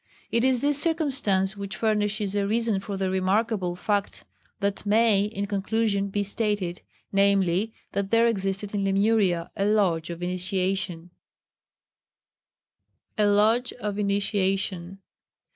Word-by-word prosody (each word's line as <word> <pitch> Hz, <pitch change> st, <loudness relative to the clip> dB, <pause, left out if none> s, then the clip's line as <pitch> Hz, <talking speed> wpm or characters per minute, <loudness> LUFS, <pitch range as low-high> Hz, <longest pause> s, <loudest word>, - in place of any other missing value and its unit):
It 230 Hz, -, +1 dB
is 255 Hz, -2 st, +2 dB
this 290 Hz, 0 st, +2 dB
circumstance 260 Hz, -, +1 dB
which 200 Hz, -1 st, -6 dB
furnishes 210 Hz, -2 st, 0 dB
a 200 Hz, -1 st, +1 dB
reason 225 Hz, -1 st, +1 dB
for 195 Hz, 0 st, -5 dB
the 190 Hz, -1 st, -1 dB
remarkable 190 Hz, 0 st, 0 dB
fact 205 Hz, +2 st, -2 dB, 0.3 s
that 200 Hz, -1 st, -2 dB
may, 210 Hz, -1 st, +3 dB
in 200 Hz, -1 st, -3 dB
conclusion, 200 Hz, 0 st, 0 dB
be 205 Hz, +1 st, -1 dB
stated 200 Hz, -4 st, -2 dB, 0.3 s
namely, 195 Hz, +1 st, +2 dB, 0.2 s
that 200 Hz, -1 st, -2 dB
there 230 Hz, +1 st, +4 dB
existed 195 Hz, -2 st, -1 dB
in 200 Hz, -1 st, -1 dB
Lemuria 195 Hz, -3 st, +1 dB
a 195 Hz, -, -1 dB
Lodge 185 Hz, -6 st, +1 dB
of 170 Hz, 0 st, -6 dB
Initiation. 185 Hz, -1 st, -2 dB, 2.0 s
[Sidenote: -, -, -47 dB
A 210 Hz, -, +4 dB
Lodge 220 Hz, +5 st, +2 dB
of 210 Hz, -4 st, -4 dB
Initiation. 195 Hz, -2 st, -1 dB
200 Hz, 125 wpm, -25 LUFS, 190-215 Hz, 2.0 s, there